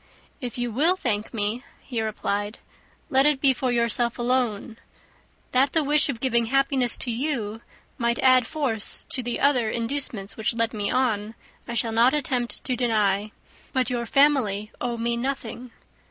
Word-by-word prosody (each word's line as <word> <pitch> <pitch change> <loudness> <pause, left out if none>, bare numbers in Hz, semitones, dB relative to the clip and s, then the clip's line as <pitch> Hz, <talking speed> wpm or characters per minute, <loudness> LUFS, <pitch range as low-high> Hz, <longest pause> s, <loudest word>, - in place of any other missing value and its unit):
"If 245 -2 -6
you 245 -1 -2
will 315 +11 +3
thank 220 - -2
me," 220 +2 -2 0.2
he 240 -4 -3
replied, 205 -1 -2 0.5
"let 270 +2 +5
it 295 -3 +2
be 270 -1 +5
for 255 0 -1
yourself 235 0 +1
alone. 240 -2 -1 0.7
That 265 +2 +3
the 320 - +3
wish 295 +1 +2
of 245 -5 -3
giving 235 -2 +1
happiness 270 -1 +1
to 245 - -2
you 230 -4 -2 0.4
might 235 0 +1
add 255 -2 +4
force 260 -9 -1
to 260 - +4
the 240 -1 -3
other 255 -6 +3
inducements 230 -4 -2
which 220 +1 -1
led 230 0 0
me 205 -2 -2
on, 225 -4 0 0.3
I 235 - -4
shall 230 -1 0
not 235 +5 +4
attempt 255 -4 -2
to 255 - -1
deny. 215 -4 +1 0.4
But 255 -2 +1
your 235 -1 -2
family 250 -8 +2
owe 240 -1 -2
me 235 +1 -1
nothing. 250 -1 -4
240 Hz, 165 wpm, -25 LUFS, 225-265 Hz, 0.7 s, let